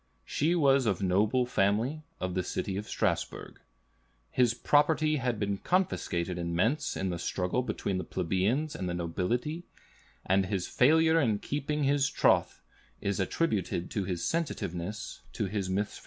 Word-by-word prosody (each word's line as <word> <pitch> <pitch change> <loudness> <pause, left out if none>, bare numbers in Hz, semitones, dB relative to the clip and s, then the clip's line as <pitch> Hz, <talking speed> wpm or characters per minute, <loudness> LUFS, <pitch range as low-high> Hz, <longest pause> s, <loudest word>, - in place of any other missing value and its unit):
She 160 +4 +1
was 140 -6 +4
of 100 -2 0
noble 105 +7 +2
family, 115 +7 +1 0.2
of 95 -1 -2
the 90 - 0
city 95 +2 -3
of 105 +2 -4
Strasbourg. - - -2 0.7
His 120 -2 +3
property 155 +3 +3
had 125 -5 -1
been 100 -1 -1
confiscated 90 - 0
in 85 0 -2
Mentz 135 - +1
in 95 -1 -1
the 85 - -4
struggle 90 +7 -1
between 100 -6 -2
the - - -3
plebeians 100 - 0
and 90 - -3
the 85 - -2
nobility, 120 - -2 0.6
and 95 0 +2
his 95 -3 -1
failure 160 +4 +4
in 110 -7 +2
keeping 150 +5 -2
his 140 +1 +2
troth - - +2 0.4
is 100 -1 -2
attributed 95 - -1
to 100 - -1
his 90 -2 -3
sensitiveness 105 - -3
to - - -1
his 95 -1 -2
misfortunes. 100 +2 -2
105 Hz, 155 wpm, -30 LUFS, 95-145 Hz, 0.7 s, was